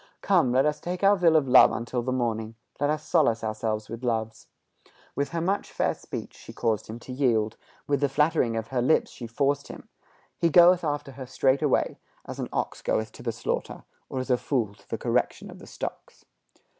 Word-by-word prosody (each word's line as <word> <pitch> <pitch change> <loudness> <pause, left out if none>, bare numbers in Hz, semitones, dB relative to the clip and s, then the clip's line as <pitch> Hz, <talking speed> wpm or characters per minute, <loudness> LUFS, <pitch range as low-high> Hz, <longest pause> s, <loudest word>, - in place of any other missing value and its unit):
Come, 125 - +3
let 130 +3 +3
us 150 0 0
take 180 +2 -5
our 200 +1 +6
fill 170 -4 +3
of 150 -4 +3
love 130 0 +7
until 120 +2 -3
the 130 +2 -2
morning: 115 -3 -2 0.2
Let 145 +1 +1
us 155 0 -2
solace 115 0 +2
ourselves 110 -1 -2
with 115 +2 -8
loves. 115 -2 -2 0.7
With 140 0 -1
her 170 -1 -3
much 195 +4 -1
fair - - 0
speech - - -8
she - - -12
caused 110 -2 -1
him 110 - -7
to 130 - -8
yield, 115 -5 +1 0.3
With 140 -2 0
the 145 - +2
flattering 135 -5 +1
of 110 0 -4
her 130 -2 0
lips 130 +6 +2
she 120 - -8
forced 140 +4 0
him. - - -11 0.5
He 170 - +3
goeth 175 +1 +6
after 145 -2 -2
her 130 -1 -9
straightway, 135 +2 +1 0.3
As - - -8
an - - -3
ox - - -3
goeth 110 0 -1
to - - -13
the 120 - -2
slaughter, 115 - -4 0.3
Or - - -5
as 130 0 -2
a 125 - +4
fool 120 -6 -1
to 100 -1 -24
the - - -2
correction - - -1
of - - -12
the - - -13
stocks." - - -8
130 Hz, 205 wpm, -26 LUFS, 115-150 Hz, 0.7 s, love